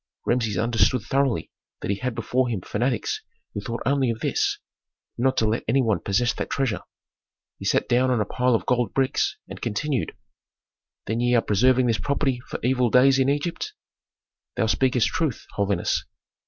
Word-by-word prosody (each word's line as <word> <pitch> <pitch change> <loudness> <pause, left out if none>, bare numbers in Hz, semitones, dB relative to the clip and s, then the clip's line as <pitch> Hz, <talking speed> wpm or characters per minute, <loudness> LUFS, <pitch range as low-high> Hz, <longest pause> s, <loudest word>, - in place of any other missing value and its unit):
Rameses 115 -4 0
understood 115 0 +2
thoroughly 135 +1 0 0.3
that - - -2
he 100 - -1
had 125 +1 -3
before 125 +3 0
him 110 -6 -2
fanatics 120 +5 -1 0.3
who 100 - -4
thought 115 +3 -5
only 135 -1 +2
of 115 -1 -3
this: - - 0 0.6
not 130 +2 +1
to 110 - +3
let 110 +2 0
any 125 +5 +3
one 110 -6 +1
possess 115 +7 +1
that - - -4
treasure. 135 -6 -1 0.8
He - - -7
sat - - +2
down 125 +1 +3
on 125 -3 +2
a 105 - +1
pile 125 +3 +1
of - - -2
gold 120 -4 0
bricks, 135 -1 +1
and - - -9
continued, 125 +3 -2 0.9
"Then 110 +2 -2
ye 120 0 +2
are 115 - +5
preserving 125 +5 +3
this 115 -5 +1
property 135 +4 0
for - - -5
evil 125 0 +2
days 130 +3 +5
in 135 0 +3
Egypt?" 145 +4 -2 0.8
"Thou - - +1
speakest 125 0 +2
truth, 155 -8 -2
holiness." 100 -3 0
120 Hz, 175 wpm, -24 LUFS, 110-130 Hz, 0.9 s, are